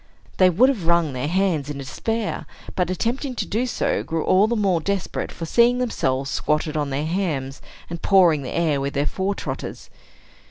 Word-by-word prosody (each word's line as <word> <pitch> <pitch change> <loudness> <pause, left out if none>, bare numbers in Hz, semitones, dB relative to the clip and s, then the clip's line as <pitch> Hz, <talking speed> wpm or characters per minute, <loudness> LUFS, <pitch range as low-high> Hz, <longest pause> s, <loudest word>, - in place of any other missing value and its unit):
They 185 -1 +6
would 210 +9 +5
have 220 -12 -1
wrung 170 -4 +3
their 130 +2 -2
hands 170 -5 0
in 145 - -4
despair, 220 - -3 0.3
but, 180 -2 0
attempting 245 - -2
to - - -2
do 235 +5 -1
so, - - 0
grew 165 -1 -2
all 195 +3 +4
the 235 - 0
more 195 -6 +1
desperate 195 +2 -2
for 165 - -6
seeing 235 +7 +4
themselves 135 - -1
squatted 155 0 0
on 145 -2 -1
their 140 +2 -2
hams, 155 -7 -2 0.3
and 170 0 -6
pawing 175 -6 +4
the 130 - -5
air 155 -5 0
with 140 +1 -3
their 140 +1 +1
fore 195 +4 -1
trotters. - - -6
170 Hz, 190 wpm, -23 LUFS, 150-200 Hz, 0.3 s, They